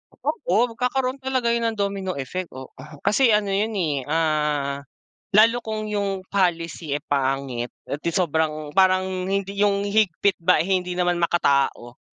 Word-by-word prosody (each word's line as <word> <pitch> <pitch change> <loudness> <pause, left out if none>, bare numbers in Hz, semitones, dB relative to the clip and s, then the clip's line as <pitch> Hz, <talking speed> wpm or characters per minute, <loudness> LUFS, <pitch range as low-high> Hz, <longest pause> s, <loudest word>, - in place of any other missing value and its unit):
Oo, 235 - 0
magkakaroon 255 +2 -1
talaga 260 -3 0
yun 235 0 +1
ng 225 - -2
domino 195 -2 -2
effect, 170 +7 -4
oo. 130 0 -9 0.3
Kasi 240 +2 +4
ano 205 -2 0
yun 210 +3 0
eh, 150 -8 -1
ah, 150 -3 0 0.6
lalo 230 +3 +6
kung 220 -2 -4
yung 200 -2 -2
policy 170 -5 0
eh 145 - -4
pangit 135 -4 -1 0.2
at 145 - -5
sobrang 160 -4 0
parang 185 0 +2
hindi 195 +1 -2
yung 200 -1 +2
higpit 200 -2 +1
ba, 170 0 +3
eh - - -6
hindi 180 0 -5
naman 175 -1 +1
makatao, 140 -7 +1
185 Hz, 150 wpm, -23 LUFS, 155-205 Hz, 0.6 s, lalo